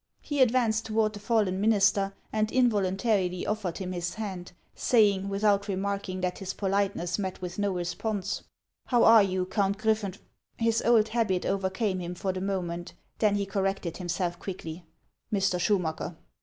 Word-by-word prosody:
He 290 -2 -1
advanced 230 -3 +3
toward 215 -1 +1
the 205 - -7
fallen 205 -3 +1
minister, 200 -2 +3 0.2
and 215 0 +2
involun 210 -6 +2
tarily 190 -5 0
offered 210 -5 -2
him 185 -1 -4
his 175 0 -3
hand, 190 -5 -5 0.2
saying, 200 -5 +3
without 200 0 +2
remarking 195 -1 -2
that 180 0 -2
his 195 0 -5
politeness 195 -3 0
met 190 -2 -3
with 180 +1 -6
no 205 -1 +1
response: 190 +3 -2 0.2
— - - -60
" - - -59
How 245 -2 +4
are 225 -1 +8
you, 185 -2 0
Count 200 +1 0
Griffenf 215 -3 0 0.3
— - - -58
His 230 0 +2
old 225 -2 +4
habit 215 -6 0
over 195 -1 0
came 190 -1 -1
him 175 0 -5
for 190 +1 -2
the 185 - -4
moment; 175 -3 -3 0.3
then 210 -2 +3
he 200 -1 0
corrected 195 -3 -2
himself 175 -1 -2
quickly 175 -3 -7 0.2
— - - -49
"Mr. 195 -3 +1
Schumacker?" 175 -4 -1
195 Hz, 175 wpm, -28 LUFS, 185-215 Hz, 0.3 s, are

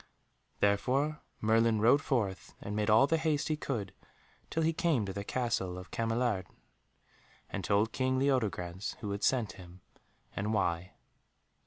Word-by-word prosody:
Therefore 130 +9 +1 0.2
Merlin 110 0 +3
rode 120 +7 +5
forth 105 -10 -2
and 105 - -5
made 105 0 0
all 110 +5 +7
the 165 +3 +1
haste 155 -2 0
he 155 - +2
could 110 -10 -4 0.6
till 165 - 0
he 165 +1 +2
came 160 - +1
to 95 - -4
the 100 - -4
Castle 110 -6 -1
of 90 +1 -10
Cameliard, 115 -4 0 1.0
and 95 - -3
told 105 +4 +2
King 130 +1 0
Leodegrance 105 -9 0
who 105 -3 -3
had 100 +1 -3
sent 120 -5 +2
him 90 -1 -13 0.5
and 105 +2 -1
why. 85 -2 -1
110 Hz, 150 wpm, -32 LUFS, 100-130 Hz, 1.0 s, all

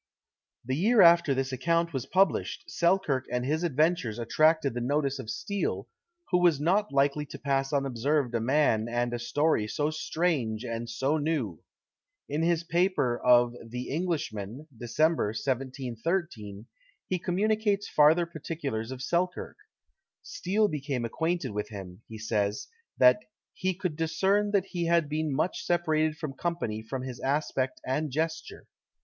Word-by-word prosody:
The 130 +2 -1
year 215 - +4
after 170 -4 +6
this 135 0 -1
account 165 +6 0
was 135 -3 -3
published, 190 -2 +1
Selkirk 170 -7 +1
and 125 0 -1
his 155 +4 0
adventures 155 -7 +1
attracted 155 +4 +2
the 120 - -3
notice 140 +2 0
of 110 - -7
Steele, 140 - -3 0.4
who 180 - +4
was 170 -5 +4
not 195 +7 +1
likely 140 +2 +2
to 140 - -8
pass 135 -1 -1
unobserved 135 -1 0
a 115 - +1
man 115 -3 +2
and 120 0 -1
a 120 - -2
story 145 -2 +1
so 145 +7 -1
strange 155 -9 -1
and 115 0 -4
so 135 +6 0
new. 145 - -2 0.7
In 150 +2 -2
his 170 0 +1
paper 170 -8 +1
of 120 -1 +5
"The 125 +2 -6
Englishman," 145 - -3
Dec. 115 0 -8
1713, 130 - -1 0.4
he 185 - -1
communicates 205 +3 0
farther 155 +3 +5
particulars 150 -8 -5
of 130 0 -6
Selkirk. 180 +6 -1 0.7
Steele 210 +4 0
became 140 -7 -3
acquainted 160 +2 -1
with 105 0 -4
him; 95 -2 -9
he 110 - -8
says, 105 -2 -1 0.3
that 125 +8 +6 0.3
"he 185 -1 -1
could 180 -4 -3
discern 190 +6 +1
that 200 -2 +1
he 175 -3 -3
had 170 -2 +3
been 155 +1 -1
much 155 +6 -1
separated 155 -3 +1
from 150 -4 -5
company 140 -10 -3
from 125 +4 -5
his 130 -2 -6
aspect 135 -2 -1
and 150 +4 -1
gesture. 160 +4 -3
145 Hz, 145 wpm, -28 LUFS, 120-170 Hz, 0.7 s, after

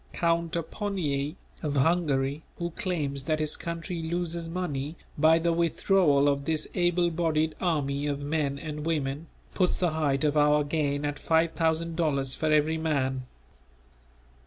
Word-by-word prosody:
Count 170 -1 0
Aponyi, 165 -4 -2 0.3
of 145 -2 -2
Hungary, 145 -2 +1 0.2
who 170 0 -3
claims 155 -9 -2
that 155 0 0
his 155 -1 +1
country 170 0 -5
loses 170 0 -3
money 160 -4 -3 0.2
by 160 +2 +5
the 170 0 +1
withdrawal 165 -3 +3
of 140 -1 +1
this 155 -1 0
able 175 -1 +2
bodied 160 -2 +1
army 145 -5 0
of 140 -1 -1
men 145 -1 -1
and 150 0 -5
women, 150 -1 -2 0.3
puts 185 -2 +1
the 175 -3 +1
height 145 -3 0
of 150 -1 +2
our 150 0 +4
gain 145 -1 -1
at 145 -1 -3
five 165 0 +2
thousand 165 0 0
dollars 140 -5 0
for 155 +2 -1
every 155 +1 +3
man. 130 -5 -1
155 Hz, 150 wpm, -28 LUFS, 145-170 Hz, 0.3 s, by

